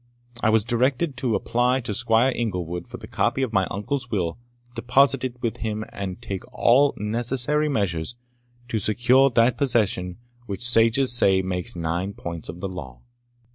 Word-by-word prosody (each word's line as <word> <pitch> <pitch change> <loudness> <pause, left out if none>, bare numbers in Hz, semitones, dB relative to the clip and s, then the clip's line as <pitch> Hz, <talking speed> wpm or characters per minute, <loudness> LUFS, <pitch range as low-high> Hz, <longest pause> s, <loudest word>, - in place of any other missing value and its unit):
I 110 - +2
was 110 -1 +3
directed 130 +5 0
to 125 -5 0
apply 125 +4 +1
to 115 -3 -4
Squire 115 +3 +2
Inglewood 90 -6 -3
for 120 0 -8
the 110 - -11
copy 120 +3 -1
of 120 -4 -3
my 95 -1 +2
uncle's 125 +6 -4
will 90 -3 -2 0.3
deposited 130 +1 +1
with 115 - -2
him, 110 -1 -4
and 95 -2 -6
take 95 -2 -5
all 140 +4 +3
necessary 125 +8 0
measures 100 - -2 0.5
to 110 - -1
secure 120 +6 +3
that 120 +1 +2
possession 105 -9 0 0.3
which 100 +5 +2
sages 120 +3 +4
say 95 -5 +4
makes 90 -1 -2
nine 85 +4 -3
points 85 -4 -7
of 85 +2 -8
the 95 - -2
law. 70 -10 -9
115 Hz, 160 wpm, -23 LUFS, 95-125 Hz, 0.5 s, sages